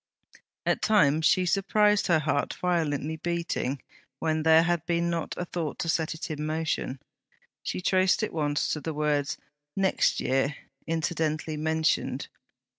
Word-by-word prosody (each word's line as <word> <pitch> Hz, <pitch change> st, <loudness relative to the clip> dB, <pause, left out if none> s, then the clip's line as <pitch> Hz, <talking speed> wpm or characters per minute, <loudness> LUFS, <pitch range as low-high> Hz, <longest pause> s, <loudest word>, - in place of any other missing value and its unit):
At -, -, +1 dB
times 160 Hz, -7 st, +4 dB
she 185 Hz, -, +3 dB
surprised 210 Hz, +3 st, +3 dB
her 170 Hz, -, +4 dB
heart 150 Hz, -2 st, -1 dB
violently 160 Hz, -3 st, -1 dB
beating 170 Hz, -5 st, -2 dB, 0.3 s
when 160 Hz, +1 st, 0 dB
there 160 Hz, +1 st, +6 dB
had 175 Hz, 0 st, +1 dB
not -, -, -35 dB
been 170 Hz, 0 st, +1 dB
a 170 Hz, +1 st, -3 dB
thought 165 Hz, -4 st, -4 dB
to 165 Hz, -, -3 dB
set 160 Hz, 0 st, 0 dB
it 160 Hz, 0 st, -6 dB
in 150 Hz, 0 st, -4 dB
motion. 155 Hz, -3 st, -2 dB, 0.6 s
She -, -, -4 dB
traced 185 Hz, +2 st, +3 dB
it 215 Hz, -, -2 dB
once 145 Hz, -2 st, 0 dB
to 150 Hz, -, -4 dB
the 160 Hz, 0 st, -4 dB
words, 150 Hz, -2 st, 0 dB, 0.4 s
'next 195 Hz, -1 st, +2 dB
year,' 135 Hz, +3 st, +1 dB, 0.3 s
incidentally 160 Hz, -1 st, -1 dB
mentioned. 160 Hz, +1 st, 0 dB
160 Hz, 145 wpm, -27 LUFS, 150-175 Hz, 0.6 s, there